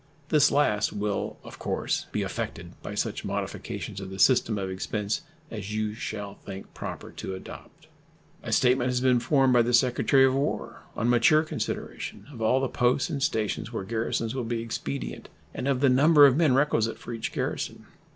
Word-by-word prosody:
This 145 -2 +5
last 105 -8 +2
will, 105 -1 -2
of - - -11
course, - - -2
be - - -1
affected - - -5
by - - -6
such - - -2
modifications - - -4
of 95 - -6
the 95 - -7
system 120 0 +4
of 95 -1 -2
expense 100 +3 -2 0.3
as 105 -1 -5
you 110 -1 -1
shall 105 -3 -5
think 95 -1 -9
proper - - -7
to 95 - -6
adopt. 95 - -11 0.6
A - - -6
statement 125 0 +3
has 125 0 +1
been 125 -1 +3
formed 130 +2 +3
by 120 - +6
the 120 +1 +3
Secretary 130 +2 +4
of 130 - +3
War, 140 +2 -2 0.2
on 115 - 0
mature 120 +6 +5
consideration, 155 - -5
of 115 - -9
all 115 +4 +3
the 135 - 0
posts 125 +2 +1
and 140 - -3
stations 110 -5 -1
where 115 - -3
garrisons 115 +1 -2
will 130 -2 -2
be 115 0 -2
expedient 70 - -5 0.2
and 130 - -3
of 135 -2 +1
the 140 - +5
number 145 +3 +7
of 135 -2 +5
men 150 -5 +4
requisite 115 -5 +2
for 120 - -8
each 115 - -4
garrison. - - -3
120 Hz, 185 wpm, -27 LUFS, 105-130 Hz, 0.6 s, number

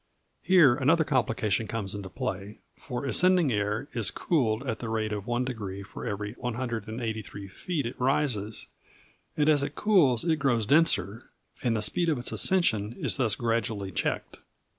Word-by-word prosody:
Here 175 -9 +6
another 150 +5 +3
complication 115 -6 0
comes 105 -4 -3
into 100 -2 -6
play, 95 +3 -5 0.2
for 125 +2 -6
ascending 175 +3 +3
air 105 +5 -1
is 115 -6 +2
cooled 125 -7 0
at 115 -2 -2
the 115 - -5
rate 110 -1 -1
of 105 -1 -5
one 120 +1 0
degree 100 -6 -5
for 100 - -8
every 105 0 -4
183 110 -4 -4
feet 150 - -4
it 125 +2 -6
rises; 125 -6 0 0.7
and 150 -1 +2
as 150 -2 +5
it 145 +1 -4
cools 165 - +3
it 160 -2 +2
grows 125 -6 +1
denser, 115 - +2 0.3
and 115 -3 0
the 105 - -1
speed 170 +10 +3
of 155 - +1
its 120 - -2
ascension 115 - +2
is - - +1
thus 115 -6 +1
gradually 110 -4 -2
checked. 80 - -3
115 Hz, 160 wpm, -27 LUFS, 105-140 Hz, 0.7 s, Here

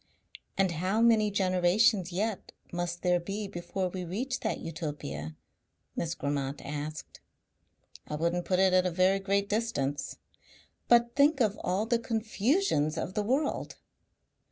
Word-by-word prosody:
"And 195 -2 +3
how 185 +6 0
many 225 -2 +4
generations 185 0 +2
yet 205 +3 -3 0.2
must 175 0 -3
there 180 -1 +3
be 200 +4 -4
before 185 0 -3
we 185 0 -5
reach 235 +10 -3
that - - -2
Utopia?" 145 - -5 0.6
Miss 170 0 -2
Grammont 140 -1 -2
asked. 150 +2 -6 0.9
"I 150 - -3
wouldn't 170 +3 0
put 185 - +1
it 190 0 +4
at 185 0 +4
a - - +1
very 185 +3 +3
great 200 +1 0
distance." 205 -11 -2 0.7
"But 235 0 +4
think 285 +1 +4
of 215 -4 +2
all 190 +4 0
the 230 +1 +1
confusions 220 - 0
of 170 +3 -3
the 210 - 0
world!" 265 +8 -1
185 Hz, 140 wpm, -29 LUFS, 170-215 Hz, 0.9 s, many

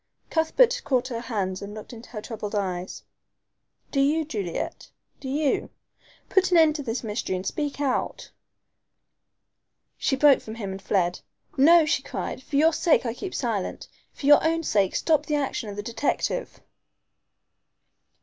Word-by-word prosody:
Cuthbert 480 +10 +3
caught 255 -1 0
her 235 -2 -3
hands 200 -6 -3
and 205 +1 -7
looked 215 +3 -9
into 230 0 -11
her 210 -3 -7
troubled 215 -3 -5
eyes. 185 -2 -3 0.9
"Do 275 - 0
you, 305 +3 +2
Juliet 200 - -4 0.3
do 265 - -6
you? 290 +1 0 0.6
Put 385 -1 +3
an 355 - +4
end 315 -2 +5
to - - -4
this 245 -2 -3
mystery 210 -3 -2
and 185 +1 -5
speak 290 +5 -3
out." 275 -3 -2 1.7
She 270 - +1
broke 280 0 +5
from 220 - -8
him 200 -4 -5
and 190 +1 -7
fled. 180 -2 0 0.4
"No," 320 +4 +6
she 320 - +1
cried, - - -5
"for 280 - -7
your 320 +3 +5
sake 315 -4 +3
I 230 - -1
keep 370 +9 -6
silent. 225 -7 -2 0.2
For - - -9
your 290 +1 +7
own 330 +1 +1
sake 200 - +1
stop 305 -2 +2
the 300 - +1
action 270 -6 -2
of 200 - -6
the 205 - -5
detective." 285 - -2
260 Hz, 160 wpm, -25 LUFS, 210-305 Hz, 1.7 s, your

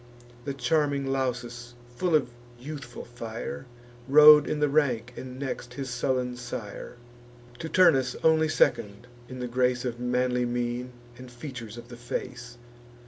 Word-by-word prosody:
The 140 - -3
charming 140 0 +1
Lausus, 120 -2 -3 0.2
full 175 +3 +1
of 130 -5 +1 0.3
youthful 135 -2 -8
fire, 120 +2 -7 0.4
Rode 150 +1 +8
in 150 - -1
the 150 - +3
rank, 125 -5 +1
and 130 -1 -8
next 135 -1 -5
his 135 -2 -5
sullen 125 0 -1
sire; 120 -1 -7 0.6
To 160 - -5
Turnus 145 -9 +4
only 160 -1 +4
second 105 -6 +1 0.2
in 130 -1 -7
the 125 - -2
grace 125 +1 0
Of 120 -1 -3
manly 125 0 0
mien, 120 +1 -3 0.3
and 130 0 -10
features 120 -3 -8
of 120 0 -11
the 120 - -10
face. 120 0 -6
125 Hz, 140 wpm, -27 LUFS, 120-140 Hz, 0.6 s, Rode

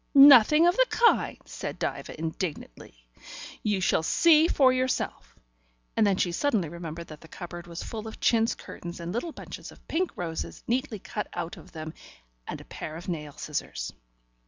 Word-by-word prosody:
"Nothing 280 +3 +9
of 350 +1 +4
the - - +4
kind," 470 -1 +3
said - - -6
Diva - - -4
indignantly. 160 - -5 0.6
"You 205 -2 0
shall 180 - +2
see 315 - +5
for 265 -6 +4
yourself" 255 - -2 0.6
and 215 - +4
then 195 -2 +2
she 175 - +1
suddenly 205 - +1
remembered 170 0 -7
that 155 -1 -10
the 165 - -13
cupboard 175 0 -8
was 170 0 -6
full 220 -1 -6
of 220 - -9
chintz 225 -1 +3
curtains 175 0 -8
and 170 +1 -5
little 250 +9 -2
bunches - - -9
of - - -19
pink 360 +3 0
roses, 165 -2 -5
neatly 250 -1 -1
cut 210 +2 -5
out 175 -1 -4
of - - -14
them, 155 0 -6 0.5
and - - -5
a - - -12
pair 155 - -7
of 170 +3 -7
nail 150 -4 -4
scissors. - - -4
180 Hz, 175 wpm, -27 LUFS, 160-255 Hz, 0.6 s, Nothing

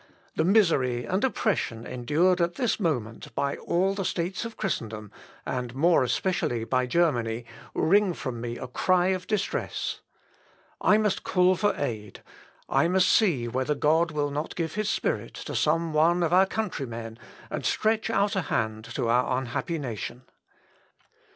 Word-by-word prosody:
The - - +2
misery 160 - +3
and 190 - -1
oppression 195 - 0
endured 160 +9 +1
at 170 0 0
this 245 +1 0
moment 125 - -2
by 140 0 -1
all 190 +3 +1
the 195 0 -3
States 180 +3 -2
of 230 - -7
Christendom, 110 - -3 0.3
and 125 -1 -3
more 165 +1 +4
especially 120 -2 0
by 130 +2 0
Germany, 120 -7 +1 0.3
wring 195 +1 +3
from 120 -3 -5
me 120 0 -4
a 130 - -6
cry 180 +8 +2
of 185 -1 -2
distress. 210 -2 -2 0.8
I 210 - +5
must 210 -2 0
call 180 0 +3
for 205 +3 +1
aid; 110 -7 -5 0.4
I - - +3
must 185 +1 +3
see 160 - +3
whether 130 +5 -1
God 160 +4 +3
will 145 -2 -1
not 150 +3 -4
give 165 -3 -2
his 215 0 -1
Spirit - - -1
to - - -6
some 165 +1 +1
one 170 +3 +3
of 170 0 +1
our 190 +1 +6
countrymen, 120 - -4 0.3
and - - -3
stretch 220 0 +1
out 205 -2 +1
a 190 - +1
hand 110 -7 -2
to 125 -4 0
our 125 +2 +2
unhappy 130 +6 -3
nation. 125 -2 -5
160 Hz, 155 wpm, -27 LUFS, 125-185 Hz, 0.8 s, our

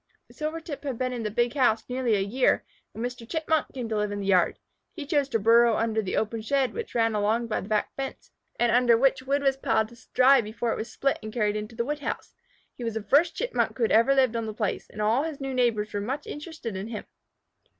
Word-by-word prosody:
Silvertip 310 -1 -5
had 270 -5 -3
been 255 0 -1
in 240 - -4
the 215 - -2
big 240 +3 0
house 245 -6 +2
nearly 250 -3 +1
a - - +1
year, 235 +7 +1 0.3
when 225 - -4
Mr. 245 -2 -7
Chipmunk 320 -2 0
came 250 -3 -5
to 220 - -2
live 210 0 0
in 205 - -3
the 200 - -4
yard. 185 -3 +3 0.4
He 310 -5 -6
chose 285 -1 +1
to 230 - +1
burrow 230 +2 +5
under 220 -1 0
the 190 - -3
open 220 +1 -1
shed 265 +3 0
which 465 - -6
ran 225 -1 +2
along 215 +3 +1
by 230 - -2
the 195 - -9
back 215 -1 0
fence, 270 -1 -6 0.3
and 240 -1 +3
under 240 -1 +5
which 265 +1 +3
wood 280 +2 0
was 270 -1 +2
piled 225 -5 +1
to 235 - -16 0.2
dry 260 +1 +6
before 225 +2 -3
it - - -4
was 225 - -5
split 275 0 0
and 215 -1 -7
carried 210 -3 0
into 215 +2 -5
the 235 - -1
wood 295 +2 -2
house. - - -5 0.4
He 245 - -9
was 230 -2 -3
the 220 - -3
first 295 - +3
Chipmunk - - -1
who 245 - 0
had 225 - +2
ever 230 +5 +5
lived 260 -3 +3
on 230 -1 -2
the 215 - -5
place, 210 -4 -2
and 210 - -4
all 225 +5 +3
his 310 -2 -4
new 270 -1 -4
neighbors 230 -5 +1
were 205 - -1
much 260 +8 -3
interested 295 - -7
in 190 +3 -4
him. 225 -2 -6
235 Hz, 250 wpm, -26 LUFS, 220-270 Hz, 0.4 s, dry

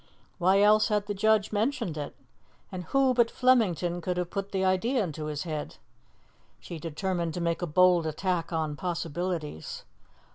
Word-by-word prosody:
Why 190 +3 +4
else 215 +1 +5
had 210 -2 0
the 205 - -3
judge 215 0 +2
mentioned 225 - -1
it? 145 -2 -6 0.6
And 180 -1 -6
who 270 +5 +3
but 235 -2 +3
Flemington 185 -10 +2
could 180 +1 -2
have 180 -1 -2
put 200 0 -4
the 190 -1 0
idea 220 +6 +1
into 155 -4 -5
his 150 -1 -3
head? 155 -4 -5 0.8
She 170 - -8
determined 170 +1 -3
to - - -3
make 170 0 -1
a 175 - -1
bold 175 +1 +4
attack 170 +2 -2
on 160 -2 -1
possibilities. 170 - -4
180 Hz, 160 wpm, -28 LUFS, 165-205 Hz, 0.8 s, else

